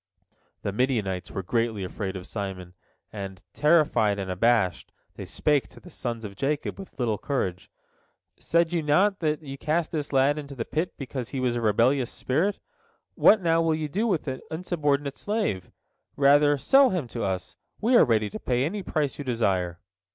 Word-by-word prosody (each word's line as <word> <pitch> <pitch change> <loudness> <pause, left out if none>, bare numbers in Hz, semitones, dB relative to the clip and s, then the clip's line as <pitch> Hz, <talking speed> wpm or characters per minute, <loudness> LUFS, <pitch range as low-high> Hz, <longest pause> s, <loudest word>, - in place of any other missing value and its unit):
The 100 - -1
Midianites 105 -6 -1
were 95 - -5
greatly 115 0 -1
afraid 95 +1 -4
of 90 -1 -6
Simon, 95 -4 -6 0.4
and, 95 -2 -7
terrified 150 -10 +3
and 95 -2 -3
abashed, 100 -2 +1 0.2
they - - -8
spake 150 -3 +1
to - - -16
the 180 - -14
sons 115 -5 -4
of 100 -1 -8
Jacob 145 - -2
with 195 - -11
little 115 -5 0
courage: 95 -11 -2 0.7
"Said 170 +1 +1
ye 170 - +1
not 185 +7 +3
that 155 -1 -1
ye 135 -1 -7
cast 160 +3 -1
this 150 -3 -3
lad 140 +2 +3
into 140 -2 -8
the 115 -3 -3
pit 160 +4 -2
because 130 -3 -5
he 135 - -4
was 125 -2 0
of 120 - -1
a - - -2
rebellious 120 +4 +2
spirit? 170 +10 0 0.6
What, 210 -3 +5
now, 165 -1 +3
will 165 -1 +2
ye 155 -1 -3
do 205 +10 -1
with 180 -8 -1
an 130 -1 -3
insubordinate 150 -5 -1
slave? 205 - -2 0.5
Rather 145 +1 +5
sell 270 - +5
him 175 -9 -2
to 115 - -5
us, 95 -2 -3 0.2
we 240 +4 +3
are - - +8
ready 110 -3 +1
to - - -6
pay 125 +1 0
any 200 +6 -3
price 150 -7 -2
you - - -3
desire." 95 -9 0
135 Hz, 185 wpm, -26 LUFS, 105-155 Hz, 0.7 s, are